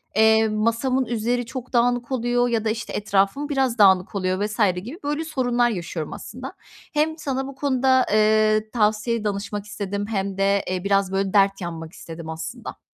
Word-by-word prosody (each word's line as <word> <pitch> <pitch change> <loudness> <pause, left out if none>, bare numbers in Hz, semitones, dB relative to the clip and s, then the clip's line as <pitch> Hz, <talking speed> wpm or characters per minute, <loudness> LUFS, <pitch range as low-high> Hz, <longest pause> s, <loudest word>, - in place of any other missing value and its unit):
eee, 220 +1 +5
masamın 230 +5 +1
üzeri 240 +1 -1
çok 255 +1 -8
dağınık 245 +1 +1
oluyor 245 -1 +1
ya 225 -2 0
da, - - +2
işte, 220 0 -4
etrafım 205 +8 0
biraz 265 -4 0
dağınık 190 -2 +4
oluyor 185 +1 0
vs. 210 +1 -6 0.2
gibi, 240 - -7
böyle, 295 +2 -1
sorunlar 245 -5 +1
yaşıyorum, 170 -6 -4
aslında. - - -8 0.4
Hem 315 +2 +1
sana 270 -3 -3
bu 275 - -9
konuda, 260 -2 +2
eee, 215 0 +3
tavsiye 215 0 +1
danışmak 205 0 -3
istedim 205 -1 -4
hem 195 -2 -2
de, 200 0 +2
eee, 185 -1 -2
biraz, 195 -1 +1
böyle, 195 0 -1
dert 195 -1 +3
yanmak 165 -1 -6
istedim, 165 -1 -9
aslında. 160 0 -7
215 Hz, 165 wpm, -23 LUFS, 195-245 Hz, 0.4 s, eee